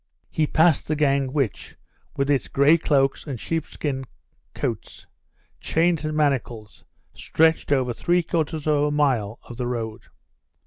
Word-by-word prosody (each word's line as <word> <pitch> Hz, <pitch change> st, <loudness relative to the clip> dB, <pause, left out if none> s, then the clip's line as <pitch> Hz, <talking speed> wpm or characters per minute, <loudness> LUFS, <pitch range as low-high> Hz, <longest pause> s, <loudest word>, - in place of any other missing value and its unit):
He 155 Hz, -1 st, +1 dB
passed 160 Hz, 0 st, +3 dB
the 155 Hz, -, 0 dB
gang, 140 Hz, -3 st, +1 dB
which, 135 Hz, -7 st, -2 dB, 0.4 s
with 140 Hz, +1 st, +1 dB
its 140 Hz, -, +1 dB
grey 140 Hz, +4 st, +4 dB
cloaks 140 Hz, -3 st, +1 dB
and 135 Hz, -5 st, -5 dB
sheepskin 145 Hz, -3 st, -3 dB, 0.5 s
coats, -, -, -5 dB, 0.5 s
chains 165 Hz, -1 st, +1 dB
and 155 Hz, 0 st, -2 dB
manacles, 125 Hz, -7 st, -1 dB, 0.3 s
stretched 160 Hz, -2 st, +1 dB
over 130 Hz, -3 st, +2 dB
three 175 Hz, +8 st, +1 dB
quarters 160 Hz, -2 st, -2 dB
of 150 Hz, -2 st, +2 dB
a 150 Hz, -, +2 dB
mile 130 Hz, -8 st, 0 dB
of 120 Hz, -, -11 dB
the 125 Hz, -1 st, -2 dB
road. 115 Hz, -2 st, -5 dB
145 Hz, 140 wpm, -23 LUFS, 130-155 Hz, 0.5 s, grey